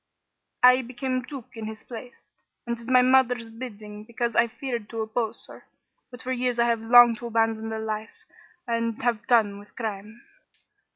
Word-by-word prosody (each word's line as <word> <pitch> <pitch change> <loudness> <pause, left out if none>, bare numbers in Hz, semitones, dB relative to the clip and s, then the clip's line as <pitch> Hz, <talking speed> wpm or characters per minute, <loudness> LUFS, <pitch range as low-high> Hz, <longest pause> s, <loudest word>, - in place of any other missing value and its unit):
I 250 +1 +7
became 255 +1 -3
duke 260 -1 -9
in 220 -1 -6
his 220 0 -8
place, 245 +1 -11 0.3
and 235 0 -2
did 235 0 -13
my 255 -1 +6
mother's 250 -3 +3
bidding 210 -3 -9
because 235 +1 -3
I 235 - +4
feared 235 -2 -5
to 225 -1 -4
oppose 220 +1 -3
her. - - -14 0.4
But 245 -2 -10
for 255 - -3
years 250 -1 -1
I 235 - +3
have 230 -1 +1
longed 235 0 +7
to 240 - -6
abandon 225 -1 0
the 220 - -3
life 220 0 -5 0.4
and 230 -1 -1
have 235 -2 0
done 210 -4 +3
with 205 - -17
crime. 220 0 -6
230 Hz, 175 wpm, -25 LUFS, 220-245 Hz, 0.4 s, I